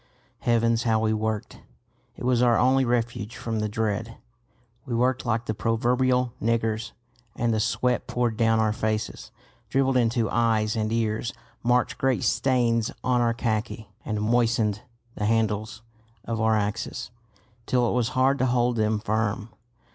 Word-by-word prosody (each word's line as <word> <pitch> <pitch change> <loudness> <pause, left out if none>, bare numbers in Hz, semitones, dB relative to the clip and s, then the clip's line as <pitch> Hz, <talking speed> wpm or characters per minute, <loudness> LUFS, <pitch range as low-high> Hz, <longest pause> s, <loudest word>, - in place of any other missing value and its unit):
Heavens, 115 -1 +2
how 115 -2 +2
we 110 0 +1
worked! 110 -1 -3 0.6
It - - -9
was 125 -1 +2
our 120 -2 +4
only 130 +1 +3
refuge 120 -2 -1
from 115 -1 -3
the 105 0 -1
dread. 110 +1 -2 0.7
We 125 -4 -3
worked 125 +1 +1
like 115 0 0
the 110 - -1
proverbial 125 +2 +1
niggers; 115 -1 -1 0.4
and 115 -1 0
the 110 - +1
sweat 125 +3 0
poured 120 -2 0
down 115 0 +2
our 110 -1 +2
faces, 110 0 -3 0.4
dribbled 135 0 +2
into 115 -1 +2
eyes 110 -2 +1
and 110 -1 -1
ears, 115 0 -1 0.3
marked 125 +4 +1
great 135 -3 +1
stains 120 -4 +2
on 125 -1 +2
our 115 -1 +1
khaki, 110 -2 -3
and 105 -2 -2
moistened 110 -2 +1 0.3
the 105 - -3
handles 110 0 0 0.4
of 115 -1 -2
our 110 0 +3
axes 105 -1 -3 0.6
till 125 -2 +2
it - - 0
was 120 -2 +1
hard 135 +2 +3
to 130 - +2
hold 120 -1 +1
them 110 0 +1
firm. 110 0 -1
115 Hz, 155 wpm, -25 LUFS, 110-120 Hz, 0.7 s, our